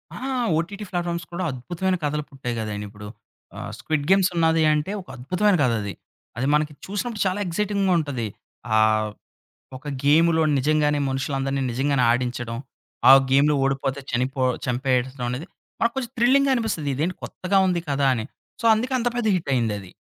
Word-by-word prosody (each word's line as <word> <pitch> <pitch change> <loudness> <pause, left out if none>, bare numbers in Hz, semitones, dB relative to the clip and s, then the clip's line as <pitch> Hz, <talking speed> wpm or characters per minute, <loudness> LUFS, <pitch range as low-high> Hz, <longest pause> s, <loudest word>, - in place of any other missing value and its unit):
ఆ! - - -7 0.4
OTT 200 +6 -3
platforms 175 -2 -2
కూడా 175 +2 -3
అద్భుతమైన 175 +9 -2
కథలు 150 0 -1
పుట్టాయి 130 -4 -5
కదండి 105 -1 -4
ఇప్పుడు. 105 0 -10 0.5
ఆ! - - -7 0.2
'స్క్విడ్ 155 -2 -2
గేమ్స్' 190 -1 +4
ఉన్నాది 165 -1 +3
అంటే 150 +5 -1
ఒక - - -18
అద్భుతమైన 180 +11 +1
కథ 125 - +3
అది. 100 -1 -4 0.4
అది 130 +3 0
మనకి 150 0 0
చూసినప్పుడు 210 +2 -3
చాలా 185 +2 -1
ఎక్సైటింగ్‌గా 195 +1 0
ఉంటది. 135 -7 -3 0.5
ఆహ్, 110 0 +3 0.7
ఒక 130 - -13 0.2
గేములో 160 +3 +4 0.2
నిజంగానే 150 +1 +2
మనుషులందరిని 135 0 -1
నిజంగానే 135 +1 +1
ఆడించడం. 120 -1 -2 0.5
ఆ - - +12 0.2
గేమ్‌లో 145 +3 +4
ఓడిపోతే 135 0 -1
చనిపో 130 +2 -1 0.2
చంపేయటం 130 0 0
అనేది, 130 +7 -4 0.3
మనకు 230 0 +1
కొంచెం 255 -2 -3
థ్రిల్లింగ్‌గా 270 +3 +4
అనిపిస్తది. 220 - -1
ఇదేంటి 165 +7 -1
కొత్తగా 195 +2 0
ఉంది 180 -2 +1
కదా! 140 0 +1
అని. 110 -3 -3 0.4
సో - - -8
అందుకే 245 +4 -2
అంత 245 0 +1
పెద్ద 240 -2 -1
హిట్టయిందది. 115 - -1
150 Hz, 155 wpm, -23 LUFS, 130-185 Hz, 0.7 s, ఆ